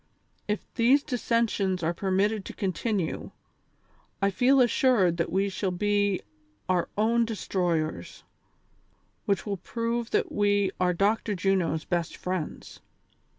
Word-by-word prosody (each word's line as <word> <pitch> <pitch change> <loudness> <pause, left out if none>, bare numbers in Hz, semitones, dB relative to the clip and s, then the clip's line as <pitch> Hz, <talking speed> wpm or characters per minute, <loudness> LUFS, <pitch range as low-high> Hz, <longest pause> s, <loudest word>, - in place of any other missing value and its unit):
If 210 0 -2
these 260 +5 +4
dissensions 225 - 0
are 165 +2 +1
permitted 195 +3 0
to - - -7
continue, 190 -1 -2 0.9
I 200 0 +2
feel 260 +7 +4
assured 240 -8 +3
that 170 - -1
we 195 +1 +1
shall 195 0 -2
be 205 +1 +1 0.5
our 180 -2 +1
own 230 +2 +3
destroyers, 180 -8 -2 1.0
which 200 -3 +1
will 200 -2 -2
prove 230 +4 -3
that - - 0
we 205 -2 +2
are 180 -1 +3
Dr. 210 +2 +1
Juno's 180 -4 0
best 175 -2 -2
friends. 180 -4 -5
200 Hz, 120 wpm, -27 LUFS, 180-225 Hz, 1.0 s, these